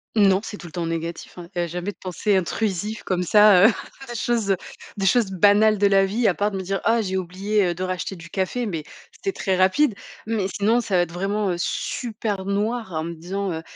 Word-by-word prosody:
Non, 195 -2 +4
c'est 205 - -7
tout 175 - -11
le - - -12
temps 170 -2 -3
négatif, 165 +2 -5
hein. 175 -1 -8
Il - - -1
y - - +2
a 170 - -1
jamais 180 +4 -4
de - - -23
pensées 190 +2 0
intrusives 205 +3 -1
comme 180 -1 -1
ça, 205 +1 +6
heu, - - +5 0.4
des 240 - -5
choses, 225 -4 0
heu, 190 - +2 0.4
des 195 - -1
choses 235 0 +4
banales 205 +3 +4
de 200 - +2
la 195 -1 +5
vie, 215 +4 +1
à 180 - +4
part 205 +3 0
de 195 - -5
me 190 - -4
dire: 195 +1 -2
«Oh, 230 - +4
j'ai 190 -2 -3
oublié, 190 +2 0
heu, 175 - 0
de 185 - -4
racheter 185 +1 -3
du 170 0 -12
café» 200 +5 -1
mais 165 -7 -3 0.3
c'était 390 - -4
très 190 -2 -1
rapide. 190 +8 +3 0.3
Mais 215 -3 -1
sinon 215 +5 +1
ça 200 -4 -2
va 175 - +5
être 170 -1 -2
vraiment, 195 +2 -1
heu, - - -1
super 210 -2 -3
noir, 210 +1 -1
en 155 - -2
me 170 +1 -4
disant, 185 +4 -4
heu: 160 - -4
195 Hz, 245 wpm, -23 LUFS, 180-210 Hz, 0.4 s, ça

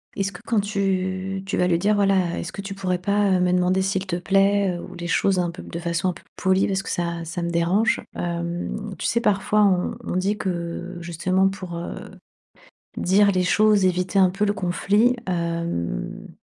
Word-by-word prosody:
est-ce 200 0 -1
que 180 - -11
quand 225 -3 +2
tu 190 -1 -2
tu 200 - -2
vas 180 - +3
lui 170 -2 +3
dire: 205 +4 +2
«Voilà 195 -4 +2
est-ce - - -6
que 200 - -5
tu 195 0 -6
pourrais 185 -2 -2
pas 200 0 +2
me 180 0 +2
demander 180 +1 +2
s'il 190 0 -1
te 175 - -1
plaît, 195 +1 +2
heu, - - -7
ou - - -10
les 175 0 -5
choses 190 +2 +2
un 175 -1 0
peu 170 - -10
de 170 - -7
façon 170 +1 -1
un - - -1
peu 170 - -15
polie 190 0 +2
parce 195 -1 -1
que - - -7
ça 170 -1 -2
ça 165 +2 -4
me 170 - -2
dérange». 175 +6 +2
Hem, 175 +4 -4
tu - - -2
sais 235 - +2
parfois 210 +1 +2
on 185 -3 +1
on - - -3
dit 195 +3 0
que 175 0 -4
justement 185 +3 +1
pour, 185 -3 -7
heu, 170 - -5 1.0
dire 200 +2 +4
les 185 - +1
choses, 210 +1 +4
éviter 185 +1 +1
un 185 - +5
peu 195 +3 -1
le 205 - +2
conflit, 205 +5 +2
hem 170 - -3
185 Hz, 205 wpm, -23 LUFS, 175-195 Hz, 1.0 s, un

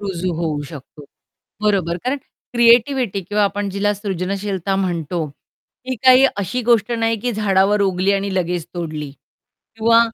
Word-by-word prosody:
रुजू 185 -3 -3
होऊ 155 -3 -2
शकतो. 145 -1 -11 0.6
बरोबर. 190 -5 +1
कारण 255 +3 0 0.4
क्रिएटिव्हिटी 235 -2 +3
किंवा 205 +3 +1
आपण 205 0 -1
जिला 200 +2 0
सृजनशीलता 195 -1 -3
म्हणतो, 175 -3 -2 0.6
ही 260 - -1
काही 255 +1 +7
अशी 205 +5 -2
गोष्ट 235 -1 +2
नाही 225 -1 +1
की 245 +2 -1
झाडावर 205 -1 +2
उगली 190 0 +1
आणि 195 -1 -1
लगेच 175 -2 -1
तोडली. 155 -4 -4 0.7
किंवा 230 +1 +5
200 Hz, 135 wpm, -19 LUFS, 180-225 Hz, 0.7 s, काही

